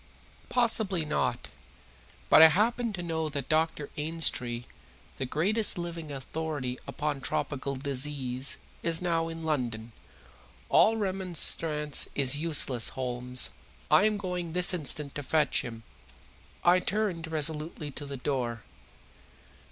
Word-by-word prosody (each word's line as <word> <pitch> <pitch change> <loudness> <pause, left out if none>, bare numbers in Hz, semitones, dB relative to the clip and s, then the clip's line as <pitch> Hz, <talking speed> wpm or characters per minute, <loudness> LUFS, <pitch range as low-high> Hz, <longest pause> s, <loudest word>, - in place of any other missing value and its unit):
"Possibly 220 -8 +2
not. 150 - -2 0.8
But - - +7
I 160 - +11
happen 230 +7 +1
to 175 -2 -5
know 160 -2 -2
that 140 -3 -5
Dr. 155 -2 0
Ainstree, 150 -6 0 0.5
the 130 - -2
greatest 200 - +1
living 170 -3 -5
authority 140 -2 -4
upon 145 -2 -3
tropical 140 0 -2
disease, 135 -1 -1 0.2
is 165 -1 +3
now 165 -2 0
in 165 0 -7
London. 120 -7 -2 0.8
All 225 +1 +4
remonstrance 170 -6 +1
is 135 -1 +3
useless, 145 -6 +3
Holmes, 125 - 0 0.4
I 205 - +6
am 215 -1 +1
going 180 -4 -4
this 180 +1 +4
instant 150 -3 +1
to 145 - -4
fetch 150 +2 +2
him." 115 -2 -8 0.8
I 175 +1 +5
turned 190 -5 -2
resolutely 155 -1 -2
to 145 +1 -7
the 140 -1 -6
door. 120 -4 -3
155 Hz, 120 wpm, -28 LUFS, 135-175 Hz, 0.8 s, I